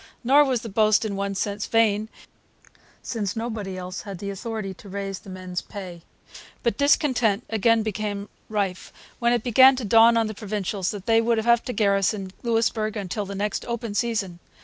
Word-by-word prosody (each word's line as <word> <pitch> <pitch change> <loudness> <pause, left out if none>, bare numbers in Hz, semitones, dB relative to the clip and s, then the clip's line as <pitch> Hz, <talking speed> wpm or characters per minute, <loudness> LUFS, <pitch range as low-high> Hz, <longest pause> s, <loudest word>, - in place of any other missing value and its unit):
Nor 280 +4 +6
was 255 -4 0
the - - -5
boast, 215 +1 +3
in 205 -2 -3
one 200 0 -2
sense, 205 +1 -2
vain, 220 -1 +2 0.9
since 205 -5 -3
nobody 220 -5 -4
else 180 0 -6
had 200 -3 -7
the 200 +2 -5
authority 210 -1 -5
to 195 +2 -14
raise 195 0 -4
the - - -14
men's 185 -1 -5
pay. 185 -4 -9 0.6
But 235 -4 +1
discontent 250 -7 +2
again 225 +1 +3
became 210 -1 -3 0.2
rife 200 -4 -2 0.3
when 235 0 +2
it 240 -2 +1
began 260 +2 +7
to 250 -3 -4
dawn 225 +3 +6
on 225 - +2
the 215 - -4
Provincials 205 -2 -3
that 200 -3 -6
they 225 0 +4
would 230 0 +1
have 235 +1 +3
to - - -3
garrison 200 -2 +1
Louisbourg 225 -2 0
till 205 -1 -2
the 200 - -6
next 205 +1 -2
open 235 -2 -3
season. 205 -6 -1
215 Hz, 180 wpm, -24 LUFS, 195-230 Hz, 0.9 s, began